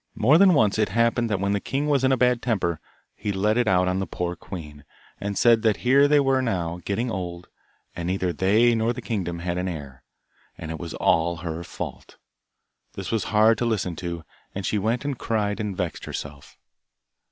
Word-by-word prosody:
More 140 +9 +4
than 190 -3 +6
once 110 -5 +3
it 105 -3 +2
happened 115 +2 +1
that 105 -3 0
when 100 +1 0
the 100 - +1
king 135 +7 -2
was 140 -3 +2
in 130 - +3
a 130 - +3
bad 125 -1 +2
temper, 90 -9 -1 0.4
he 105 - -3
let 105 +3 +1
it 120 -1 +1
out 90 -2 +3
on 90 +1 0
the 95 - -2
poor 90 +1 -3
queen, 75 -4 -9 0.4
and 100 0 -3
said 115 -2 +5
that 110 -2 +2
here 140 +3 +6
they 145 0 +4
were 135 -1 +2
now, 90 -8 -2
getting 115 +4 -1
old, 90 -3 -5 0.5
and 85 0 -4
neither 90 -1 -1
they 105 +8 +3
nor 115 +1 +1
the 125 - -7
kingdom 95 -7 -3
had 90 +1 -3
an 90 - -2
heir, 70 -6 -7 0.6
and 80 0 -6
it 80 - -5
was 85 -2 -6
all 85 +1 +2
her 85 +1 -4
fault. - - -8 0.8
This - - -6
was 115 -2 0
hard 110 +1 +4
to 120 - 0
listen 100 -7 -1
to, 85 -2 -5 0.3
and 95 -1 -4
she 105 - 0
went 115 +6 -1
and 140 -4 -3
cried 105 -2 -1
and 105 -3 -3
vexed 90 -4 -3
herself. 70 -1 -8
100 Hz, 210 wpm, -24 LUFS, 85-115 Hz, 0.8 s, than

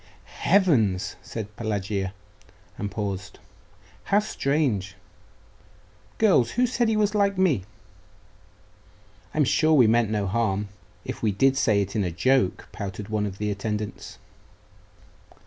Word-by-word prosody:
'Heavens!' 115 - +2
said 105 +2 -7
Pelagia, 100 -3 -2 0.6
and 100 +2 -4
paused.... 100 -3 -5 0.7
'How 200 - +2
strange! 140 - 0 1.2
Girls, 185 - +4
who 250 - +3
said 240 -1 +1
he 220 - +1
was 210 -1 +2
like 200 -2 +2
me?' 155 - +2 1.7
'I'm 155 - +4
sure 155 +4 +3
we 130 -6 +6
meant 115 0 +3
no 105 -2 -1
harm, 105 0 -1 0.4
if - - -6
we 110 - +2
did 135 +7 +3
say 110 -6 +2
it 100 +3 -8
in 105 - +1
a 90 - -1
joke,' 100 +4 +1
pouted 100 +1 -6
one 105 -1 0
of 95 -1 -7
the 105 0 -2
attendants. 105 +1 -4
110 Hz, 130 wpm, -25 LUFS, 100-145 Hz, 1.7 s, we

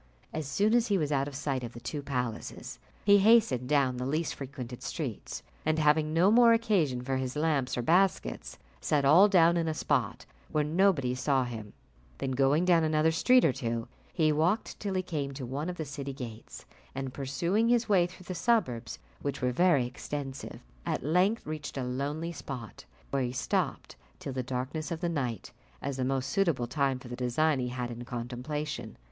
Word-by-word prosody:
As 155 -3 -3
soon 205 +9 +2
as 240 0 +3
he 200 - +2
was 150 -4 -1
out 140 -1 +1
of 145 - -7
sight 135 -2 -2
of 120 0 -6
the 120 - -9
two 145 +4 -4
palaces, 125 -5 -4 0.3
he 205 0 +7
hastened 205 - +4
down 135 -4 +2
the 125 - -3
least 155 +3 -1
frequented 130 -3 -7
streets; - - -5 0.2
and 155 0 +1
having 155 0 +3
no 175 +5 +4
more 235 0 +7
occasion 180 - +1
for 135 +1 -1
his 130 0 -3
lamps 150 -5 0
or 120 - -1
basket, 180 +6 +1 0.2
set 145 -2 +1
all 170 +9 +7
down 170 -3 +5
in 165 -1 0
a 160 - -1
spot - - -1 0.3
where 150 - +2
nobody 155 -5 +2
saw 130 +1 +1
him; 110 -4 -7 0.4
then 130 - -3
going 135 +6 +3
down 170 -3 +4
another 155 0 +3
street 250 +10 +4
or 135 - +3
two, 115 -3 -3 0.2
he 155 -3 +2
walked 165 +9 0
till 200 -2 -3
he 185 - 0
came 145 -6 -3
to 135 -2 -5
one 140 +7 -3
of 180 - -5
the 160 - -3
city 140 0 -5
gates, 120 -5 -9 0.3
and 135 -1 -4
pursuing 170 - 0
his 240 -1 +3
way 185 -5 +4
through 185 +1 -14
the 185 - -5
suburbs, 145 - 0 0.2
which 140 -1 -3
were 125 0 +1
very 170 -2 +3
extensive, 135 +2 -6 0.2
at - - -2
length 180 - +2
reached 155 -2 -5
a 130 - -1
lonely 145 +6 -3
spot, 130 -8 -8 0.3
where 140 - +1
he 125 -1 -1
stopped 125 - -2 0.2
till 135 - -6
the 130 - -1
darkness 130 +5 -4
of 170 -2 -3
the 175 - -1
night, 125 - -3 0.3
as 140 -1 -4
the 130 - -1
most 130 0 -1
suitable 170 -11 +1
time 135 +1 0
for 125 - -12
the 120 - -6
design 130 +4 +1
he 125 - -1
had 125 -1 -4
in 120 +1 -7
contemplation. 125 +2 -5
145 Hz, 195 wpm, -29 LUFS, 130-170 Hz, 0.4 s, he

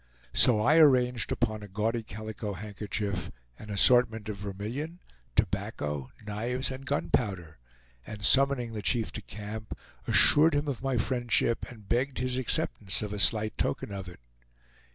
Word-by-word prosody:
So 120 -4 +5
I 145 +8 +4
arranged 125 -5 +3
upon 110 -3 -1
a 105 - -9
gaudy 110 +4 -2
calico 110 -1 -7
handkerchief, 100 -1 -4 0.3
an 105 - -11
assortment 110 +1 +4
of 105 - -5
vermilion, 110 - -6 0.4
tobacco, 75 -3 -2 0.2
knives, 120 +6 -2
and 135 +1 -8
gunpowder, 95 - -2 0.5
and 105 -1 -8
summoning 135 -3 +3
the 105 - -4
chief 115 +1 0
to 110 - -6
camp, 105 +1 -8 0.3
assured 155 +1 +5
him 145 +1 -1
of 135 -4 -4
my 135 -1 -1
friendship 120 -1 0
and 110 -5 -13
begged 130 +5 -1
his 130 0 -1
acceptance 105 -5 +3
of 105 -1 -5
a 105 - -4
slight 110 +1 +2
token - - -2
of 95 -2 -6
it. 90 -8 -12
110 Hz, 150 wpm, -28 LUFS, 105-125 Hz, 0.5 s, So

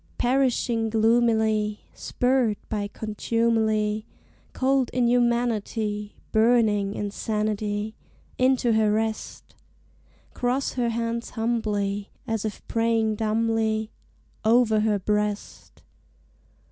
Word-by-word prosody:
Perishing 245 -3 +1
gloomily, 220 -2 +2
Spurred 245 -4 0
by 205 -2 -2
contumely, 220 0 0 0.4
Cold 265 -1 +1
inhumanity, 235 -4 0 0.2
Burning 220 -3 +3
insanity, 210 0 -2 0.5
Into 255 -2 +3
her 220 -1 +3
rest! 220 +1 -3 0.8
Cross 255 +2 -1
her 240 -2 0
hands 230 0 -2
humbly, 210 -3 -1 0.2
As 225 -1 -2
if 215 - -6
praying 225 -1 +1
dumbly, 220 0 0 0.5
Over 220 -1 +4
her 210 -1 +2
breast! 210 +1 -3
220 Hz, 85 wpm, -25 LUFS, 210-235 Hz, 0.8 s, Over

